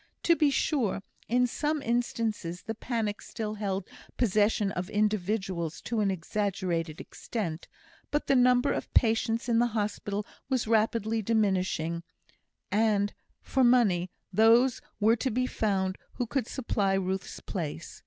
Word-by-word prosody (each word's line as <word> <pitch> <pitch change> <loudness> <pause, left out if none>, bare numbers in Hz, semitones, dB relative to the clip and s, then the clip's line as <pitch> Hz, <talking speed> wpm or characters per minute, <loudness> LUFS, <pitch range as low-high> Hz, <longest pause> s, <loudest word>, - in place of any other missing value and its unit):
To 335 - +5
be 300 -3 +3
sure, 260 -8 0 0.2
in 250 +2 +3
some 295 +4 -1
instances 225 -7 -1
the 225 - -3
panic 225 -2 -2
still 215 -1 -5
held 200 -3 -3 0.3
possession 210 -2 +2
of 180 0 -4
individuals 200 -5 -1
to 230 -1 -2
an 205 -2 +2
exaggerated 180 -3 -2
extent. 175 -8 -5 0.4
But 295 - 0
the 275 - +3
number 250 0 +4
of - - -4
patients 225 0 +2
in 230 -1 +3
the 240 - +4
hospital 205 0 -2 0.2
was 260 -3 +1
rapidly 220 0 +1
diminishing, 190 -6 0 0.7
and, 205 -1 +2 0.3
for 265 - +1
money, 210 -8 +4 0.2
those 230 +5 +5 0.2
were 225 +2 +4
to 260 - -1
be 255 +2 0
found 190 -5 -1
who 245 - -2
could 245 0 -1
supply 205 -6 0
Ruth's 190 0 -2
place. 165 -3 -5
215 Hz, 135 wpm, -29 LUFS, 190-235 Hz, 0.7 s, To